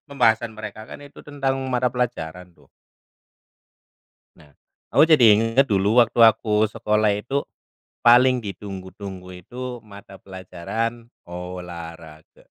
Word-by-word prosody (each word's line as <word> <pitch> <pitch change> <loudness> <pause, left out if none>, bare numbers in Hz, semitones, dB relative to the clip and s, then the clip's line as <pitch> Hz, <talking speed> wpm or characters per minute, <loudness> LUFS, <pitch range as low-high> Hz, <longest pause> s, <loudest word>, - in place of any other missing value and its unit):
Pembahasan 115 -4 +1
mereka 110 0 -8
kan - - -10
itu 140 - -14
tentang 140 -2 -2 0.2
mata 125 0 +1
pelajaran 90 -8 -4
tuh. - - -26 1.7
Nah, 75 -2 -20 0.4
aku - - +5
jadi 155 -7 +5
inget 115 +5 +2
dulu 105 +5 +4
waktu 115 - -5
aku 110 -1 +2
sekolah 105 -1 0
itu, 125 +7 -2 0.7
paling 125 +2 +6
ditunggu-tunggu 95 -1 -8
itu 125 +5 -8
mata 100 -2 -14
pelajaran 100 +5 -5 0.2
olahraga. 85 -3 -10
110 Hz, 110 wpm, -22 LUFS, 90-120 Hz, 1.7 s, paling